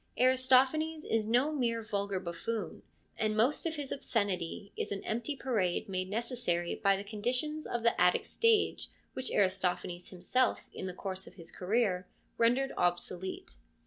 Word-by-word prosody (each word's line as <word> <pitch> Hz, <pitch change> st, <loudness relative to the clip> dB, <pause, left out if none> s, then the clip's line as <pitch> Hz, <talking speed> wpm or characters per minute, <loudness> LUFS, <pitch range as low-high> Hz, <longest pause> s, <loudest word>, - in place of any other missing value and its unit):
Aristo 255 Hz, +1 st, +5 dB
phanes 310 Hz, +3 st, -4 dB
is 220 Hz, -1 st, 0 dB
no 250 Hz, +7 st, +3 dB
mere 235 Hz, -5 st, 0 dB
vulgar 200 Hz, -2 st, -1 dB
buffoon, 185 Hz, +5 st, -4 dB, 0.4 s
and 215 Hz, 0 st, +1 dB
most 255 Hz, +9 st, +2 dB
of 320 Hz, -, -2 dB
his 290 Hz, -3 st, -4 dB
obscenity 200 Hz, -6 st, -1 dB
is -, -, -3 dB
an 200 Hz, -, -3 dB
empty 240 Hz, +6 st, -2 dB
parade 220 Hz, -7 st, 0 dB
made 185 Hz, -1 st, -2 dB
necessary 215 Hz, -6 st, -1 dB
by 195 Hz, -1 st, +3 dB
the 200 Hz, -, -5 dB
conditions 250 Hz, +9 st, -2 dB
of 240 Hz, -1 st, -2 dB
the 235 Hz, -, +2 dB
Attic -, -, +4 dB
stage 460 Hz, -2 st, +2 dB, 0.2 s
which 260 Hz, -, -3 dB
Aristophanes 180 Hz, -2 st, 0 dB
himself 195 Hz, +8 st, 0 dB
in -, -, -5 dB
the 180 Hz, -, -5 dB
course 190 Hz, 0 st, -5 dB
of -, -, -13 dB
his 170 Hz, -2 st, -11 dB
career 190 Hz, -1 st, 0 dB, 0.3 s
rendered 245 Hz, +4 st, +3 dB
obsolete. 175 Hz, -, -2 dB
220 Hz, 155 wpm, -32 LUFS, 185-255 Hz, 0.4 s, Aristo